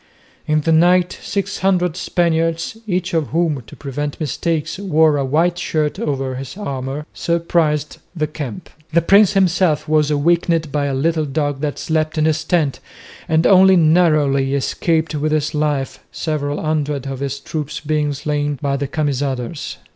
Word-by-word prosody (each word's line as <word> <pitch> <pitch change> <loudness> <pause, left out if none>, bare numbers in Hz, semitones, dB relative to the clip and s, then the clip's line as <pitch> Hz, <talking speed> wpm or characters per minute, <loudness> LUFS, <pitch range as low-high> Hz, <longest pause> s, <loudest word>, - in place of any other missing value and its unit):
In 155 0 +2
the 165 - 0
night 175 +2 +3
six 200 -1 -3
hundred 180 -3 +1
Spaniards, 165 0 0
each 185 -1 -1
of 160 -4 +1
whom 160 -2 0
to - - -12
prevent 145 +1 -5
mistakes 160 +3 -2
wore 160 -6 +3
a 140 - 0
white 165 +6 +1
shirt 155 -3 -1
over 135 -3 -2
his 135 +6 -7
armour, 140 -5 -4
surprised 165 -3 0 0.2
the 155 -2 0
camp. 145 -7 -7 0.2
The 170 +1 +3
prince 200 +3 +5
himself 185 -5 +2
was 155 -1 +2
awakened 160 +1 +1
by 145 0 0
a 140 -1 -1
little 160 +3 +1
dog 145 -1 -2
that 150 -2 -2
slept 155 0 -1
in 155 - +2
his 155 0 +1
tent 160 -5 0 0.5
and 160 +1 +2
only 190 -1 +7
narrowly 155 -5 +3
escaped 160 +4 0
with 150 +1 -1
his 155 -1 0
life, 150 -3 -1
several 145 -2 -2
hundred 150 -3 -1
of 135 -1 -5
his 140 0 -3
troops 150 +1 -5
being 150 -1 0
slain 145 0 -2
by 140 -1 -1
the 140 0 -2
Camisaders. 140 -1 -3
155 Hz, 160 wpm, -19 LUFS, 145-165 Hz, 0.5 s, only